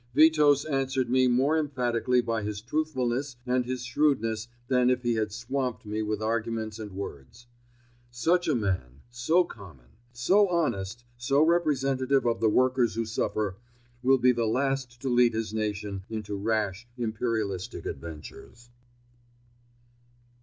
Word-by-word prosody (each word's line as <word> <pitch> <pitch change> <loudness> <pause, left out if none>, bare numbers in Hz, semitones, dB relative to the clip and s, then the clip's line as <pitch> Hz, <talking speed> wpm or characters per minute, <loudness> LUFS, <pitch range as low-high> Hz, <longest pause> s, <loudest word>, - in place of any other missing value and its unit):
Witos 150 -2 +5
answered 135 -3 0
me 130 0 +4
more 130 +5 +3
emphatically 125 -4 +1
by 115 -2 -2
his 105 0 -4
truthfulness 130 0 -2
and 125 0 +1
his 125 -1 -3
shrewdness 120 -4 +1 0.2
than 125 -1 +3
if 125 0 +1
he 120 -1 +1
had 110 -2 -1
swamped 125 +2 -3
me 105 +1 -2
with 105 0 -2
arguments 110 -1 -2
and 105 -3 -7
words. 100 - -8 0.6
Such 170 +9 +1
a 155 - +2
man, 90 - -2
so 140 +9 +3
common; 80 - -13 0.2
so 185 - +3
honest, 120 - -1
so 135 +5 +3
representative 135 -5 +2
of 115 -1 +1
the 110 -1 +3
workers 125 +1 +2
who 115 0 -1
suffer, 105 -3 -2 0.4
will 135 +1 +4
be 125 0 +4
the 120 -2 0
last 130 0 -1
to - - -2
lead 120 -2 +4
his 110 -1 -3
nation 105 -2 -3
into 105 -2 -4
rash, 105 +1 -1
imperialistic 110 -5 -2
adventures. 85 - -9
120 Hz, 140 wpm, -28 LUFS, 110-130 Hz, 0.6 s, Witos